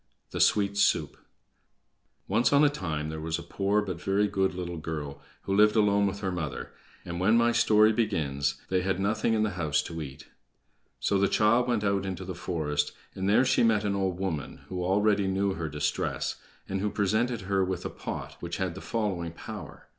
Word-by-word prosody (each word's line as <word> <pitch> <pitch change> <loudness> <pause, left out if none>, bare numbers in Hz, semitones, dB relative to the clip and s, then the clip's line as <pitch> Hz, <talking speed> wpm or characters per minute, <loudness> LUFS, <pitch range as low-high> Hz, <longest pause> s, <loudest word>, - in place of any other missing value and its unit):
The - - -2
Sweet 100 -1 +3
Soup - - +2 1.1
Once 120 - +2
on 145 +1 +5
a 150 - +6
time 80 - -3
there 80 0 -5
was 80 0 -2
a 85 - -7
poor 100 +4 0
but 90 -4 -5
very 100 +2 +2
good 95 -2 0
little 90 -1 -4
girl, 75 -3 -5 0.2
who 95 - -1
lived 105 +1 +5
alone 100 -2 +4
with 100 +1 -4
her 95 -2 -1
mother, 80 -5 -4 0.3
and 85 0 -4
when 105 +5 +4
my 120 0 +4
story 110 -2 +5
begins, 70 -11 0
they 95 -1 +2
had 95 0 -1
nothing 110 +3 +1
in 110 - +2
the 105 - 0
house 75 -3 +1
to 80 -1 -6
eat. 70 -2 -8 0.7
So 100 - +1
the 100 - +4
child 115 +5 +3
went 120 -4 +1
out 100 -1 +1
into 95 -1 -4
the 95 - -4
forest, 75 -5 -2 0.2
and 95 +1 -2
there 110 +5 +5
she - - +3
met 110 -2 +3
an 100 -1 0
old 95 -2 -1
woman, 90 -6 -4
who 90 -1 -3
already 100 +2 +2
knew 95 +1 +1
her 80 -3 -4
distress, 75 0 -2 0.3
and 95 0 -2
who 105 - 0
presented 110 +4 0
her 95 0 +1
with 95 -1 -3
a - - -1
pot - - -6
which 85 0 -4
had 95 -2 -1
the - - -9
following 95 -7 -2
power. - - -9
95 Hz, 200 wpm, -28 LUFS, 85-105 Hz, 1.1 s, a